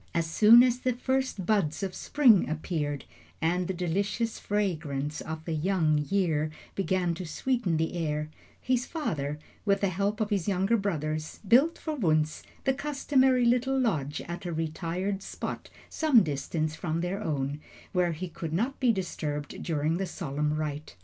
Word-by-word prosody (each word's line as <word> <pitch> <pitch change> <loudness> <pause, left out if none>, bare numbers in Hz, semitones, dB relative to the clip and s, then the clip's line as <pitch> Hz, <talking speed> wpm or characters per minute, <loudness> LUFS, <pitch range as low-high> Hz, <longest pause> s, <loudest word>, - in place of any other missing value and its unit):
As 170 -1 +2
soon 215 +8 +7
as 250 -1 +2
the 255 0 0
first 260 -5 -1
buds 195 -5 +1
of 190 -1 -2
spring 240 - +4
appeared 150 -3 -2 0.3
and 175 +2 +1
the - - -1
delicious 200 +6 -1
fragrance 155 -8 -2
of 160 0 -6
the 165 - -2
young 160 -2 +2
year 165 -6 +1 0.2
began 185 -3 0
to 170 - -5
sweeten 205 -1 0
the 160 +1 -1
air, 150 -2 -1 0.3
his 250 -1 0
father, 150 - -2 0.3
with 200 -2 +2
the 200 - +2
help 200 +4 -1
of 215 -1 -1
his 200 -3 0
younger 195 +3 +2
brothers, 155 -7 -2
built 275 - +5
for 310 -2 -4
Wunzh 155 - +1 0.2
the 270 - +2
customary 265 -3 +2
little 250 +3 +2
lodge 155 - 0
at 175 +1 -6
a - - -2
retired 170 +5 -2
spot - - -6 0.2
some 290 - +4
distance 155 +1 -2
from 160 0 -2
their 185 +4 -2
own, 145 -3 -2 0.3
where 180 -2 +1
he 170 +1 -6
would 160 -2 -3
not 240 +11 -1
be 250 -3 +4
disturbed 150 -7 -4
during 160 0 0
the 190 0 -2
solemn 150 -3 -2
rite. 155 -1 -4
180 Hz, 165 wpm, -28 LUFS, 155-220 Hz, 0.3 s, soon